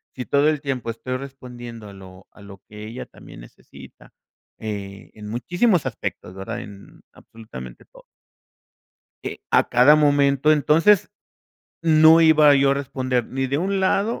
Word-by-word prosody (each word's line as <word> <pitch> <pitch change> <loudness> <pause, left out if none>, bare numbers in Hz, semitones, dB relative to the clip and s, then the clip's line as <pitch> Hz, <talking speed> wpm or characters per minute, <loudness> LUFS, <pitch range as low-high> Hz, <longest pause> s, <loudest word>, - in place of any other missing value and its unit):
si 125 - -6
todo 145 +2 +2
el 155 -1 -1
tiempo 135 -5 -4
estoy 125 +3 -6
respondiendo 125 -4 -10
a - - -13
lo 95 0 -15
a - - -18
lo 100 -1 -13
que 105 0 -10
ella 115 +3 -8
también - - -15
necesita, - - -16 0.5
eh, 100 -2 -7
en 105 -1 -10
muchísimos 175 - 0
aspectos, 90 - -6
¿verdad? 115 +5 -6
En 100 -4 -14
absolutamente 65 - -12
todo. - - -19 1.2
Que - - -7
a - - +2
cada 140 +5 +5
momento, 145 0 +3
entonces 165 +8 +3 0.7
no 160 0 +6
iba 155 -3 +5
yo 140 0 +3
a - - +2
responder 130 -3 -3
ni 135 0 -3
de 140 +2 -2
un 195 +3 -1
lado 200 +4 0
130 Hz, 150 wpm, -21 LUFS, 110-150 Hz, 1.2 s, no